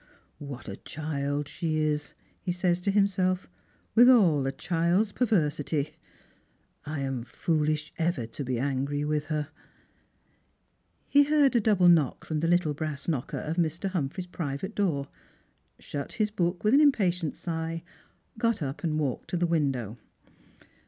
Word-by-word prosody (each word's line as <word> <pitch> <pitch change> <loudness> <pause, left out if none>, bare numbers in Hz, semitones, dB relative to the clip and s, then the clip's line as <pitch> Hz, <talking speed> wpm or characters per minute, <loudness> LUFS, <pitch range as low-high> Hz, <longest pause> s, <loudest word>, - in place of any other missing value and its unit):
" - - -39
What 140 -5 -8
a 100 -1 -6
child 145 -2 -3
she 160 0 -2
is," 150 -1 -1 0.3
he 185 - -2
says 175 0 +1
to 200 - -1
himself, 190 -2 +2 0.2
" - - -38
with 240 +2 +8
all 170 - +5
a - - 0
child's 170 +7 +1
perversity! 155 - 0 0.9
I 150 -1 -3
am 135 -2 -2
foolish 155 +4 -1
ever 165 -8 0
to 115 +5 -6
be 130 -2 -2
angry 140 +3 -1
with 150 0 0
her." 150 -2 -2 1.6
He 285 0 +5
heard 290 -3 +3
a 235 - +4
double 200 -4 +4
knock 160 -7 +3
from 155 -1 -2
the 165 - 0
little 175 -3 +2
brass 150 -1 -5
knocker 145 -7 -2
of 160 +3 -4
Mr. 170 +3 0
Humphreys' 175 0 -2
private 170 +2 -4
door, 160 -10 0 0.7
shut 140 -2 -6
his 215 -2 0
book 175 -3 -1
with 215 +3 +3
an 285 - +7
impatient 185 - +2
sigh, 165 -1 -4 0.6
got 230 -7 +1
up 135 +1 -5
and 155 -2 0
walked 140 -5 -2
to 180 - -1
the 175 - +2
window. 135 -9 -1
160 Hz, 155 wpm, -28 LUFS, 145-185 Hz, 1.6 s, with